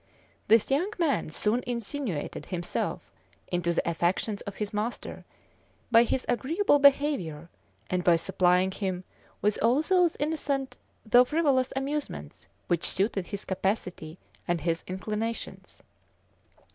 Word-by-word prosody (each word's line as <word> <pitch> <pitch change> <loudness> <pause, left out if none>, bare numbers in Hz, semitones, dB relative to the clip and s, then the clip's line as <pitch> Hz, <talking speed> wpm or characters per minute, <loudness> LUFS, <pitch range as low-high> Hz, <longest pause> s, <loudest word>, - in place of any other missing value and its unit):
This 225 +3 +4
young 340 +10 +1
man 315 - +1
soon 215 +9 +1
insinuated 235 - -4
himself 175 -2 -3 0.4
into 175 -1 0
the 170 - -1
affections 175 +5 0
of 200 - -5
his 210 -1 -4
master, 215 +3 -4 0.7
by 230 0 +7
his 255 - -1
agreeable 290 - +2
behavior, 270 - +2 0.4
and 180 +5 -1
by 175 -1 +5
supplying 180 +1 +2
him 185 -2 -3 0.4
with 210 0 +2
all 245 +7 +3
those 360 -2 +3
innocent 285 -3 -1 0.3
though 245 +3 +7
frivolous 275 -2 +1
amusements 270 - -4 0.2
which 175 -1 0
suited 195 -2 0
his 200 -1 -6
capacity 185 -4 -2 0.3
and 175 -2 0
his 165 +1 -1
inclinations. 215 +5 -4
215 Hz, 120 wpm, -28 LUFS, 180-270 Hz, 0.7 s, by